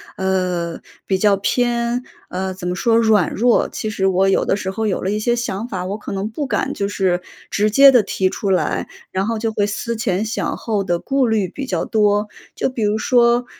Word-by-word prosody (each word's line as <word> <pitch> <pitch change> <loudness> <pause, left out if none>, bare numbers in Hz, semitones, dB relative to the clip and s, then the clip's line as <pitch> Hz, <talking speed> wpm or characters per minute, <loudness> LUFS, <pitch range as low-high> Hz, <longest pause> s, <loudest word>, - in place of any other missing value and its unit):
呃， 180 -3 -1 0.2
比 190 -1 0
较 200 -1 +4
偏， 240 +3 0 0.3
呃， 190 +1 -3
怎 185 -1 -6
么 180 - -1
说？ 225 +4 +2
软 220 -6 +3
弱。 240 +1 +2
其 215 - -4
实 195 -3 0
我 190 0 +3
有 195 - +3
的 - - +1
时 190 -2 -3
候 220 +3 -2
有 190 - -1
了 190 - 0
一 210 - -1
些 240 +3 +1
想 235 -2 -3
法， 185 -6 -4
我 195 +3 -3
可 205 - -8
能 195 +1 -2
不 275 +6 -4
敢 270 +1 -1
就 200 0 -2
是 185 -3 0 0.3
直 210 +1 +2
接 275 +6 +8
地 250 -3 +5
提 190 -2 0
出 200 - -3
来， 185 - 0 0.2
然 190 +2 -1
后 230 -1 -1
就 225 0 -1
会 205 -1 +1
思 235 +3 -3
前 215 -3 -1
想 225 +3 -2
后 210 -3 -1
地 175 -2 0
顾 270 +6 0
虑 215 -4 +1
比 275 +9 -6
较 - - -1
多。 210 -1 +2 0.3
就 - - 0
比 255 -3 -5
如 210 +1 +1
说 240 +1 +3
210 Hz, 240 characters per minute, -19 LUFS, 190-235 Hz, 0.3 s, 接